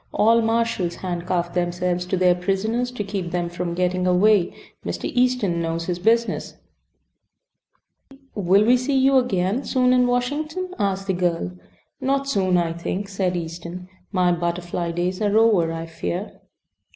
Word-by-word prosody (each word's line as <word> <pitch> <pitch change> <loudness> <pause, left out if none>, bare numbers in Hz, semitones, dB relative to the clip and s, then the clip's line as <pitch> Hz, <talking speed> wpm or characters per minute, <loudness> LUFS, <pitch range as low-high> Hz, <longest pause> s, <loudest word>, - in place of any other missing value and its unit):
"All 230 +2 +4
marshals 225 -6 0
handcuff 175 -1 -2
themselves 180 0 -1
to 185 - 0
their 180 0 +4
prisoners 200 +7 -1
to 250 -4 -4
keep 195 -3 -4
them 175 -1 -2
from 175 0 -4
getting 180 0 0
away. 185 0 +4 0.3
Mr. - - -4
Easton 245 -9 +1
knows 165 0 -2
his 175 0 -2
business." 230 +4 +1 1.8
"Will 200 +1 +3
we 245 +2 +5
see 265 +2 0
you 265 +1 +4
again 210 -1 0
soon 255 -1 +2
in 250 -1 +4
Washington?" 305 +9 -2
asked 195 -1 -1
the 190 - 0
girl. 175 - -1 0.5
"Not 275 +1 0
soon, 190 -8 +2
I 170 -1 0
think," 185 +4 -4
said 190 -2 -1
Easton. 170 +2 -7 0.2
"My 180 -3 +2
butterfly 175 0 -2
days 180 +3 -2
are 210 0 +2
over, 210 -8 +4
I 165 0 -4
fear." 175 +4 -5
185 Hz, 150 wpm, -23 LUFS, 175-230 Hz, 1.8 s, we